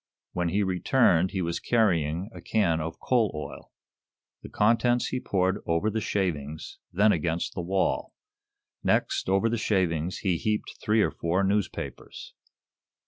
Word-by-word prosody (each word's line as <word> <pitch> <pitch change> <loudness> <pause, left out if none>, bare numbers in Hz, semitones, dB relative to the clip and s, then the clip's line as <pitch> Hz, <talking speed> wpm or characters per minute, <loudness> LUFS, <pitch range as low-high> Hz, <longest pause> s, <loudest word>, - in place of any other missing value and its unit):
When 90 -1 0
he 100 +4 +1
returned 95 -1 +3
he 95 -1 -2
was 85 0 -2
carrying 90 -4 +1
a - - -10
can 85 -8 +1
of 80 +1 -5
coal 115 -5 +2
oil. 75 - -8 0.7
The - - -10
contents 120 +3 +2
he 130 - -2
poured 95 -2 0
over 85 +6 +1
the 110 +1 -2
shavings, 80 -8 -3
then 105 +4 +4
against 85 0 -1
the 90 - -3
wall. 95 +2 -1 0.7
Next, - - +1
over 95 +4 +3
the 115 0 -1
shavings, 90 -5 0
he 90 -4 0
heaped 105 +4 -2
three 105 0 +3
or - - 0
four 85 +4 0
newspapers. 95 -8 -3
95 Hz, 145 wpm, -27 LUFS, 85-105 Hz, 0.7 s, then